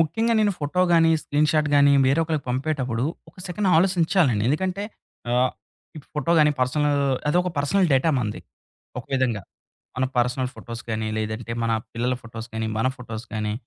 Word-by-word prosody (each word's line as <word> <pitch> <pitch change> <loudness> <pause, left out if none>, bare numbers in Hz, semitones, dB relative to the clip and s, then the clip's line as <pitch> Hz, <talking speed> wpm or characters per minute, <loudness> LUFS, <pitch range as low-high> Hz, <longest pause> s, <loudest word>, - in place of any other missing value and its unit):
ముఖ్యంగా 225 +9 +1
నేను 210 -1 +3
ఫోటో 150 +5 -1
గాని, 165 -1 +5
స్క్రీన్‌ 150 +1 +1
షాట్ 155 -1 +2
గాని 140 0 +6
వేరే 140 +5 +3
ఒకళ్ళకి 155 -3 -2
పంపేటప్పుడు 130 -3 -1 0.2
ఒక - - -19
సెకండ్ 190 +3 -1
ఆలోసించాలండి. 165 - +2
ఎందుకంటే 185 +7 -1 0.5
ఆహ్, 125 +1 +3 0.5
ఈ - - -5 0.2
ఫోటో 150 +3 0
గాని, 150 -1 +5
పర్సనల్ 145 +3 +1 0.3
అది 150 - +2
ఒక 180 - -2
పర్సనల్ 180 +7 +2
డేటా 135 +5 +3
మనది 105 -4 -3 0.6
ఒక 120 - -7
విధంగా. 125 -6 0 0.5
మన 130 - +1
పర్సనల్ 125 +1 +1
ఫోటోస్ 115 -1 -8
గానీ, 110 0 -2
లేదంటే 110 +2 -4
మన 115 0 +1 0.2
పిల్లల 120 +2 -1
ఫోటోస్ 115 0 -8
గానీ 110 0 -2
మన 115 - +1
ఫోటోస్ 115 -2 -8
గానీ, 105 -1 -2
135 Hz, 165 wpm, -24 LUFS, 115-160 Hz, 0.6 s, గాని